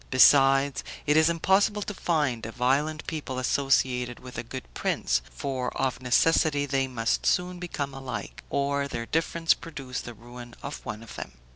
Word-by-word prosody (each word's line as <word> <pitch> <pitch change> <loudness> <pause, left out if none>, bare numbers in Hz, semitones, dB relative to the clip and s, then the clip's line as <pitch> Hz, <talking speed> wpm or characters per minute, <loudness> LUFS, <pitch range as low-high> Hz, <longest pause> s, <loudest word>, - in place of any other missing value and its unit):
Besides, 135 +1 +5 0.2
it 150 0 +3
is 160 +1 +5
impossible 195 +5 +2
to 210 - -5
find 150 - 0
a - - -6
violent 140 +6 0
people 150 -5 -4
associated 130 -2 +1
with 125 0 -11
a 120 - -2
good 125 +2 -7
prince, - - 0
for 130 -3 -3
of 130 -2 -1
necessity 145 +3 +3
they 135 -1 0
must 115 -3 -1
soon 180 0 +1
become 145 -6 -4
alike, 125 -6 -6
or 140 0 0
their 115 -4 -4
difference 165 +3 +2
produce 135 -6 -6
the 120 - -9
ruin 120 +1 -11
of 140 - -6
one 105 +1 -5
of 115 - -11
them. - - -6
135 Hz, 165 wpm, -27 LUFS, 125-155 Hz, 0.2 s, Besides